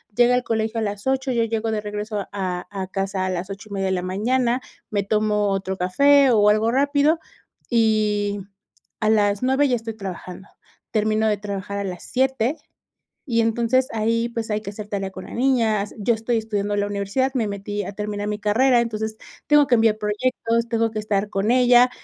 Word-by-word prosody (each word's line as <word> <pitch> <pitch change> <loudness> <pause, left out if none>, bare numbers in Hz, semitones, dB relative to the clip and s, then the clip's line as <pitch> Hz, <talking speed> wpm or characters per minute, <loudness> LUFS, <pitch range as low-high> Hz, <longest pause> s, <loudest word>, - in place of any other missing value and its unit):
llega 245 +1 +5
al 250 - +1
colegio 225 0 -1
a - - -1
las 205 +2 -4
8, 265 0 0
yo 235 -2 +2
llego 225 0 -2
de 215 -1 -1
regreso 210 0 -4
a 185 -3 -2
a 190 -1 -4
casa 195 0 -2
a - - -1
las 185 +1 -3
8 200 +2 -8
y - - -8
media 195 -1 -1
de - - 0
la 180 - -1
mañana, 235 +7 0 0.3
me 200 -2 0
tomo 210 0 +1
otro 190 -1 -2
café, 280 +9 +4
o 210 -2 +5
algo 215 +2 +3
rápido, 285 +4 +2 0.5
y 215 -3 +1 0.6
a 215 - +2
las 205 -2 +2
9 265 +3 +3
ya 250 - +2
estoy 225 -1 -5
trabajando. 190 -2 -8 0.4
Termino 215 0 +1
de 210 -1 +1
trabajar 200 0 -5
a - - -2
las 180 -3 -6
7, 265 +1 0 0.7
y 230 -5 +1
entonces 235 +3 +2
ahí, 230 +1 0
pues, 230 -2 -4
hay 210 0 0
que 210 - -6
hacer 210 0 -8
tarea 195 -2 -3
con - - -9
la - - -10
niña, 230 -5 +2
yo 225 +3 +2
estoy 225 +1 -1
estudiando 205 -2 -2
la 205 0 0
universidad, 205 +7 -1
me 230 -4 +1
metí 205 +1 -4
a 200 - -6
terminar 205 0 -4
mi 210 0 -3
carrera. 240 +4 +3
Entonces, 220 -1 -3 0.3
tengo 295 -1 +6
que 245 - +4
enviar 225 -2 +3
proyectos, 230 +2 -1
tengo 230 -1 +1
que 215 - -3
estar 210 -1 -1
con 195 +1 -1
ella. 250 0 +6
215 Hz, 200 wpm, -22 LUFS, 205-235 Hz, 0.7 s, tengo